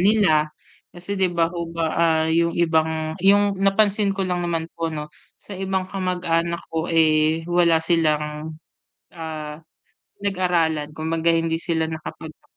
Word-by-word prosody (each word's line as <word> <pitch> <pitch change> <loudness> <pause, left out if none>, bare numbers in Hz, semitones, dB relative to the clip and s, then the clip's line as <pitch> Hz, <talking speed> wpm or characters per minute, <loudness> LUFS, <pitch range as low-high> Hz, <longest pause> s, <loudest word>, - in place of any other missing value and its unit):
nila. 185 -7 +3 0.4
Kasi, 185 +3 -5
'di 190 -1 +3
ba 165 -1 +2
ho 170 -1 -4
ba, 165 0 -1
ah, 160 -1 +2
'yong 170 +1 +1
ibang 160 -1 +1
'yong 200 +1 +4
napansin 200 0 +3
ko 195 - 0
lang 180 -1 -1
naman 165 -1 -1
po, 165 0 -1
'no, 150 -1 -5 0.3
sa - - -13
ibang 190 0 -1
kamag-anak 170 -3 -1
ko, 160 +1 -2
eh, 160 0 +3
wala 175 -1 +4
silang, 155 -2 0 0.6
ah, 155 -2 -6 0.6
pinag-aralan. 175 -6 0
Kumbaga 160 +1 -1
hindi 165 0 0
sila 165 -2 0
nakapagtapos 160 0 -9
165 Hz, 140 wpm, -22 LUFS, 160-185 Hz, 0.6 s, yong